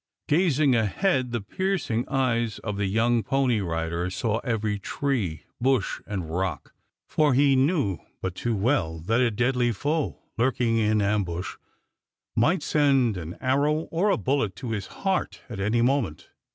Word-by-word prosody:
Gazing 150 Hz, -4 st, +3 dB
ahead, 125 Hz, -, +1 dB
the 120 Hz, -2 st, -2 dB
piercing 135 Hz, -, -2 dB
eyes 120 Hz, -4 st, 0 dB
of 105 Hz, -2 st, -4 dB
the 100 Hz, -1 st, 0 dB
young 115 Hz, +4 st, +2 dB
pony 130 Hz, -2 st, +1 dB
rider 85 Hz, 0 st, -2 dB
saw 110 Hz, +3 st, -1 dB
every 110 Hz, -4 st, -1 dB
tree, 100 Hz, -, -2 dB, 0.2 s
bush, 130 Hz, -5 st, +1 dB
and 95 Hz, -5 st, -3 dB
rock, 95 Hz, +1 st, -3 dB, 0.3 s
for 150 Hz, -4 st, +2 dB
he 140 Hz, 0 st, +4 dB
knew 130 Hz, -, +1 dB, 0.2 s
but 95 Hz, -, -3 dB
too 115 Hz, +4 st, -2 dB
well 100 Hz, -, +1 dB
that 115 Hz, +8 st, +1 dB
a 125 Hz, -, +4 dB
deadly 125 Hz, +2 st, +1 dB
foe, 145 Hz, +8 st, -1 dB, 0.2 s
lurking 120 Hz, -2 st, +2 dB
in 110 Hz, -1 st, +2 dB
ambush, 95 Hz, -4 st, -1 dB, 0.8 s
might 155 Hz, +11 st, +2 dB
send 135 Hz, -7 st, +3 dB
an 85 Hz, -1 st, -6 dB
arrow 145 Hz, +4 st, +2 dB
or 180 Hz, +6 st, +2 dB
a 195 Hz, -, +3 dB
bullet 130 Hz, -8 st, 0 dB
to 115 Hz, +4 st, -5 dB
his 105 Hz, -4 st, -3 dB
heart 190 Hz, -1 st, -2 dB
at 110 Hz, -5 st, -6 dB
any 110 Hz, +4 st, +1 dB
moment. 125 Hz, -, 0 dB
120 Hz, 150 wpm, -26 LUFS, 100-135 Hz, 0.8 s, he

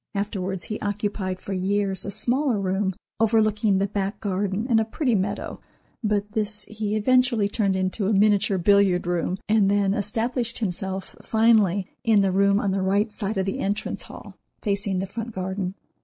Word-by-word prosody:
Afterwards 195 Hz, -3 st, -2 dB
he 215 Hz, -, -4 dB
occupied 205 Hz, -2 st, -2 dB
for 195 Hz, -, -6 dB
years 195 Hz, +1 st, 0 dB
a -, -, -3 dB
smaller 235 Hz, +4 st, +1 dB
room 190 Hz, 0 st, -1 dB, 0.2 s
overlooking 215 Hz, -2 st, +3 dB
the 195 Hz, -, +2 dB
back 200 Hz, 0 st, -3 dB
garden 200 Hz, +1 st, -1 dB
and 230 Hz, -4 st, +4 dB
a -, -, +3 dB
pretty 245 Hz, +3 st, -1 dB
meadow, 195 Hz, -2 st, -2 dB, 0.4 s
but 210 Hz, -1 st, 0 dB
this 210 Hz, -1 st, -1 dB
he 215 Hz, -1 st, -3 dB
eventually 245 Hz, -1 st, +3 dB
turned 200 Hz, -2 st, 0 dB
into 190 Hz, +2 st, 0 dB
a -, -, +2 dB
miniature 205 Hz, 0 st, +3 dB
billiard 190 Hz, -1 st, +3 dB
room, 175 Hz, +1 st, -1 dB
and 215 Hz, -2 st, +3 dB
then 200 Hz, -1 st, +2 dB
established 230 Hz, +3 st, -1 dB
himself, 190 Hz, -2 st, -4 dB
finally, 215 Hz, -4 st, +3 dB, 0.2 s
in 220 Hz, -3 st, +4 dB
the 195 Hz, -, +2 dB
room 200 Hz, +1 st, +3 dB
on 200 Hz, -, 0 dB
the 195 Hz, 0 st, 0 dB
right 200 Hz, +3 st, +1 dB
side 205 Hz, 0 st, -3 dB
of 190 Hz, -, +1 dB
the 195 Hz, -, -3 dB
entrance 205 Hz, +2 st, -2 dB
hall -, -, -11 dB, 0.2 s
facing 200 Hz, -2 st, 0 dB
the 190 Hz, -, -1 dB
front 225 Hz, +4 st, -6 dB
garden. 190 Hz, 0 st, -3 dB
205 Hz, 170 wpm, -24 LUFS, 190-215 Hz, 0.4 s, and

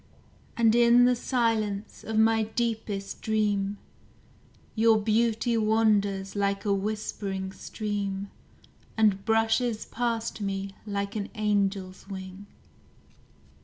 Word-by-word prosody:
And 225 Hz, -2 st, +4 dB
in 240 Hz, +1 st, +6 dB
the 250 Hz, 0 st, +4 dB
silence 225 Hz, -4 st, -1 dB
of 220 Hz, -1 st, -3 dB
my 225 Hz, 0 st, +4 dB
deepest 220 Hz, -3 st, -3 dB
dream, 205 Hz, -2 st, 0 dB, 1.0 s
Your 225 Hz, 0 st, +4 dB
beauty 225 Hz, +2 st, +1 dB
wanders 210 Hz, -3 st, +1 dB
like 200 Hz, 0 st, 0 dB
a 200 Hz, -, +2 dB
whispering 195 Hz, -1 st, -3 dB
stream, 200 Hz, -1 st, -4 dB, 0.7 s
And 205 Hz, -3 st, +3 dB
brushes 225 Hz, +1 st, +1 dB
past 230 Hz, -2 st, -2 dB
me 195 Hz, 0 st, -3 dB, 0.2 s
like 200 Hz, 0 st, -3 dB
an 205 Hz, -2 st, -2 dB
angel's 200 Hz, -3 st, -1 dB
wing. 190 Hz, +1 st, -8 dB
210 Hz, 100 wpm, -27 LUFS, 200-225 Hz, 1.0 s, in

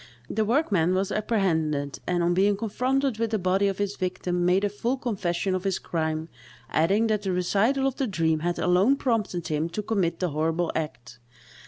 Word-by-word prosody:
The 220 Hz, -, +1 dB
workman 205 Hz, -, +2 dB
was 190 Hz, +1 st, 0 dB
apprehended, 160 Hz, -10 st, 0 dB
and, 175 Hz, -1 st, +1 dB
on 175 Hz, +1 st, +2 dB
being 200 Hz, +2 st, +3 dB
confronted 250 Hz, +3 st, 0 dB
with 230 Hz, -1 st, 0 dB
the 220 Hz, -, 0 dB
body 190 Hz, +1 st, +2 dB
of 195 Hz, -1 st, -1 dB
his 205 Hz, 0 st, -2 dB
victim, 180 Hz, -1 st, -2 dB
made 180 Hz, +3 st, +3 dB
a 205 Hz, -, +2 dB
full 235 Hz, +6 st, -2 dB
confession 190 Hz, -7 st, -1 dB
of 185 Hz, -1 st, -2 dB
his 195 Hz, -2 st, 0 dB
crime, 160 Hz, -1 st, -2 dB, 0.4 s
adding 195 Hz, +8 st, +3 dB
that 215 Hz, -2 st, +1 dB
the 195 Hz, -, -2 dB
recital 210 Hz, +9 st, +1 dB
of 270 Hz, -1 st, -1 dB
the 270 Hz, -, 0 dB
dream 160 Hz, -5 st, +1 dB
had 175 Hz, +2 st, -1 dB
alone 185 Hz, +9 st, +3 dB
prompted 225 Hz, -, -1 dB
him 155 Hz, +2 st, -1 dB
to 210 Hz, +5 st, -4 dB
commit 190 Hz, -6 st, 0 dB
the 180 Hz, -, 0 dB
horrible 160 Hz, +3 st, 0 dB
act. 120 Hz, -6 st, -5 dB
190 Hz, 190 wpm, -26 LUFS, 170-215 Hz, 0.4 s, being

